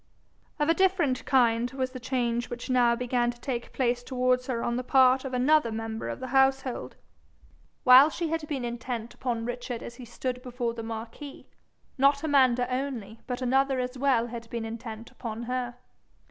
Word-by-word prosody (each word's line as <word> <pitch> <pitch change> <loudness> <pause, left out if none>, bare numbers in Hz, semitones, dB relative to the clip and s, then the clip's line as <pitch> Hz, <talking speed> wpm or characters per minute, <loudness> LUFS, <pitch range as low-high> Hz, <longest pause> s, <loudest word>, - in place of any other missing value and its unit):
Of 295 -1 +1
a 330 - +5
different 340 -10 +2
kind 240 -3 +3
was 260 -1 -2
the 255 - -7
change 245 -1 -1
which 240 +1 -5
now 240 -2 +4
began 245 0 0
to 240 0 -6
take 240 -2 -4
place 245 -2 0
towards 250 0 0
her 235 -3 -2
on 235 - -1
the 250 - -2
part 260 0 +4
of 265 - -4
another 255 0 +3
member 225 0 -4
of - - -5
the 260 0 -6
household. 265 -1 +1 0.9
While 255 +4 +9
she 335 +1 -3
had 325 -1 -2
been 270 -5 -3
intent 235 -1 -5
upon 235 -3 -3
Richard 245 0 -5
as 235 - -7
he 250 - -9
stood 250 +2 -4
before 245 -2 -3
the 230 - -6
marquis, 225 +5 -7 0.5
not 280 +2 +4
Amanda 260 -5 +3
only 245 -5 -4
but 250 0 -3
another 265 +1 +2
as 250 +1 -3
well 260 -3 +2
had 230 -1 -8
been 235 -1 -4
intent 225 0 -7
upon 230 -1 -6
her. 245 0 -3
250 Hz, 180 wpm, -27 LUFS, 235-265 Hz, 0.9 s, While